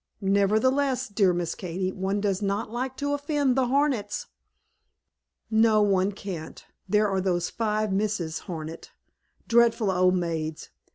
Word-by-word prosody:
"Nevertheless, 250 Hz, +7 st, +2 dB
dear 200 Hz, -2 st, +3 dB
Miss 175 Hz, -2 st, -2 dB
Katy, 185 Hz, +1 st, -3 dB
one 190 Hz, +2 st, -2 dB
does 200 Hz, -1 st, -1 dB
not 200 Hz, +1 st, -2 dB
like 255 Hz, +2 st, -3 dB
to 285 Hz, 0 st, -1 dB
offend 285 Hz, -2 st, 0 dB
the 260 Hz, -2 st, +2 dB
Hornets." 255 Hz, -6 st, 0 dB, 1.3 s
"No, 220 Hz, -1 st, +4 dB
one 195 Hz, -1 st, +2 dB
can't. 190 Hz, -5 st, -8 dB, 0.2 s
There 210 Hz, +2 st, +3 dB
are 195 Hz, -1 st, 0 dB
those 175 Hz, -2 st, 0 dB
five 215 Hz, -2 st, -1 dB
Misses 195 Hz, -5 st, -1 dB
Hornet, 160 Hz, -1 st, -6 dB, 0.6 s
dreadful 230 Hz, -3 st, +3 dB
old 185 Hz, 0 st, +3 dB
maids! 160 Hz, -3 st, -3 dB
205 Hz, 130 wpm, -26 LUFS, 185-235 Hz, 1.3 s, No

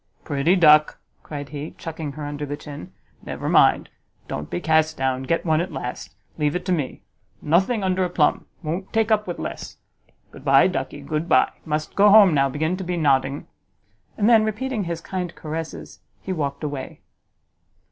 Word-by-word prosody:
"Pretty 145 Hz, +5 st, +1 dB
duck!" 155 Hz, -4 st, +5 dB, 0.2 s
cried 145 Hz, -2 st, -7 dB
he, 145 Hz, +2 st, -7 dB
chucking 160 Hz, -3 st, -6 dB
her 150 Hz, 0 st, -6 dB
under 145 Hz, 0 st, -5 dB
the 145 Hz, 0 st, -4 dB
chin; 145 Hz, -, -9 dB, 0.3 s
"never -, -, -6 dB
mind, -, -, +4 dB, 0.4 s
don't 75 Hz, 0 st, -5 dB
be 85 Hz, -, -3 dB
cast 160 Hz, 0 st, +2 dB
down; 130 Hz, -1 st, 0 dB
get 165 Hz, +7 st, -1 dB
one 160 Hz, -1 st, +2 dB
at 180 Hz, -, -4 dB
last. 125 Hz, -, -6 dB, 0.2 s
Leave 150 Hz, +1 st, +1 dB
it 180 Hz, -, -3 dB
to 185 Hz, -, -1 dB
me. 150 Hz, -7 st, -2 dB, 0.4 s
Nothing 190 Hz, +8 st, +1 dB
under 185 Hz, 0 st, +1 dB
a 180 Hz, -, -1 dB
plum; 160 Hz, -4 st, +1 dB, 0.2 s
won't 170 Hz, +5 st, -4 dB
take 225 Hz, 0 st, +1 dB
up 210 Hz, -2 st, +2 dB
with 175 Hz, -, -4 dB
less. -, -, -6 dB, 0.5 s
Good -, -, -13 dB
by, -, -, +5 dB
ducky, -, -, -3 dB
good 155 Hz, +2 st, -3 dB
by! -, -, +4 dB
must 155 Hz, -1 st, -3 dB
go 205 Hz, +1 st, +5 dB
home 200 Hz, -4 st, +7 dB
now, 140 Hz, -1 st, +3 dB
begin 155 Hz, +6 st, -1 dB
to 190 Hz, -, -5 dB
be 175 Hz, 0 st, -3 dB
nodding." 140 Hz, -2 st, +1 dB, 0.7 s
And 210 Hz, -, +2 dB
then, 225 Hz, -2 st, +6 dB
repeating 215 Hz, 0 st, -2 dB
his 170 Hz, -1 st, -4 dB
kind 180 Hz, -2 st, -5 dB
caresses, 160 Hz, +1 st, -7 dB, 0.2 s
he 190 Hz, -, -4 dB
walked 140 Hz, -3 st, -3 dB
away. 145 Hz, -3 st, -5 dB
160 Hz, 180 wpm, -23 LUFS, 145-185 Hz, 0.7 s, home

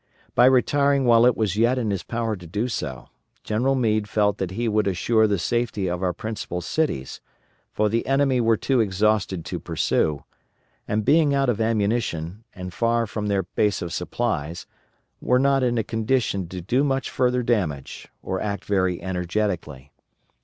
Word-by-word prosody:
By 125 Hz, -, +6 dB
retiring 140 Hz, +1 st, +3 dB
while 120 Hz, 0 st, +6 dB
it 125 Hz, -, +2 dB
was 105 Hz, -4 st, 0 dB
yet 120 Hz, +4 st, +2 dB
in 115 Hz, -4 st, -1 dB
his 95 Hz, -3 st, -2 dB
power 115 Hz, +3 st, -2 dB
to 90 Hz, -3 st, -11 dB
do 105 Hz, +8 st, -2 dB
so, 75 Hz, -, -5 dB, 0.3 s
General 125 Hz, +6 st, +1 dB
Meade 110 Hz, -4 st, 0 dB
felt 105 Hz, 0 st, +1 dB
that 95 Hz, -, -2 dB
he 115 Hz, +6 st, -2 dB
would 105 Hz, -1 st, +1 dB
assure 110 Hz, +4 st, +2 dB
the 100 Hz, -1 st, +1 dB
safety 110 Hz, 0 st, -1 dB
of 90 Hz, 0 st, -2 dB
our 90 Hz, -1 st, +1 dB
principal 95 Hz, -1 st, -5 dB
cities, 90 Hz, -, -2 dB, 0.5 s
for 105 Hz, -, +1 dB
the 115 Hz, +2 st, -1 dB
enemy 135 Hz, -2 st, +2 dB
were 115 Hz, -1 st, +3 dB
too 130 Hz, +2 st, +1 dB
exhausted 100 Hz, -3 st, +1 dB
to -, -, -4 dB
pursue; 75 Hz, -3 st, 0 dB, 0.6 s
and 105 Hz, 0 st, -1 dB
being 145 Hz, 0 st, +4 dB
out 135 Hz, -2 st, +2 dB
of 115 Hz, -2 st, 0 dB
ammunition, 105 Hz, -4 st, -1 dB
and 90 Hz, -2 st, -7 dB
far 115 Hz, 0 st, +1 dB
from 105 Hz, -1 st, -4 dB
their 100 Hz, -2 st, +1 dB
base 100 Hz, +3 st, 0 dB
of 85 Hz, -, -5 dB
supplies, 85 Hz, -5 st, -3 dB, 0.6 s
were 125 Hz, -, +3 dB
not 135 Hz, +1 st, +3 dB
in 120 Hz, -2 st, +1 dB
a 115 Hz, -, +1 dB
condition 110 Hz, -4 st, -1 dB
to 90 Hz, 0 st, -6 dB
do 125 Hz, +10 st, +1 dB
much 135 Hz, -2 st, -1 dB
further 125 Hz, 0 st, +1 dB
damage, 90 Hz, -, -2 dB, 0.2 s
or 95 Hz, 0 st, -3 dB
act 100 Hz, -1 st, -3 dB
very 95 Hz, -3 st, +1 dB
energetically. 90 Hz, -7 st, -3 dB
110 Hz, 175 wpm, -23 LUFS, 95-120 Hz, 0.6 s, By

